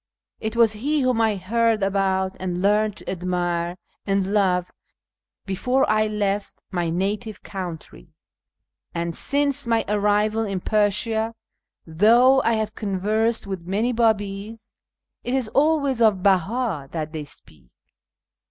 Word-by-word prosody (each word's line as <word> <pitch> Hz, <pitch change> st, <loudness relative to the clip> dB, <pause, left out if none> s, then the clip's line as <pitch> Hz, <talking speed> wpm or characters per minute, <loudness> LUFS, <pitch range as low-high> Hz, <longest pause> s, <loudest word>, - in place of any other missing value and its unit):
It 220 Hz, +1 st, -4 dB
was 230 Hz, -2 st, +4 dB
he 285 Hz, +8 st, 0 dB
whom 255 Hz, -3 st, +2 dB
I 220 Hz, -2 st, +2 dB
heard 220 Hz, +3 st, +1 dB
about 190 Hz, -1 st, 0 dB
and 180 Hz, -1 st, -3 dB
learned 210 Hz, +2 st, +2 dB
to -, -, -10 dB
admire 175 Hz, -1 st, -2 dB, 0.3 s
and 195 Hz, 0 st, 0 dB
love 180 Hz, -4 st, +1 dB, 0.7 s
before 250 Hz, +7 st, +1 dB
I 215 Hz, 0 st, +2 dB
left 205 Hz, -1 st, -2 dB
my 175 Hz, -2 st, -1 dB
native 200 Hz, +4 st, -3 dB
country: 175 Hz, -3 st, -8 dB, 0.8 s
and 170 Hz, -1 st, -2 dB
since 280 Hz, -2 st, 0 dB
my 230 Hz, -1 st, +1 dB
arrival 210 Hz, +2 st, +1 dB
in 195 Hz, -3 st, -2 dB
Persia, 220 Hz, +3 st, +1 dB, 0.5 s
though 235 Hz, +11 st, +5 dB
I 230 Hz, -, +2 dB
have 220 Hz, -1 st, -1 dB
conversed 215 Hz, +3 st, 0 dB
with 190 Hz, -3 st, -6 dB
many 215 Hz, +6 st, 0 dB
Babis, 220 Hz, -1 st, -1 dB, 0.5 s
it 245 Hz, -, -1 dB
is 255 Hz, -5 st, 0 dB
always 280 Hz, -3 st, +2 dB
of 205 Hz, -5 st, +3 dB
Beh;i 195 Hz, -, +1 dB
that 155 Hz, +1 st, -5 dB
they 155 Hz, -1 st, -4 dB
speak. 80 Hz, -, -12 dB
205 Hz, 130 wpm, -23 LUFS, 185-225 Hz, 0.8 s, though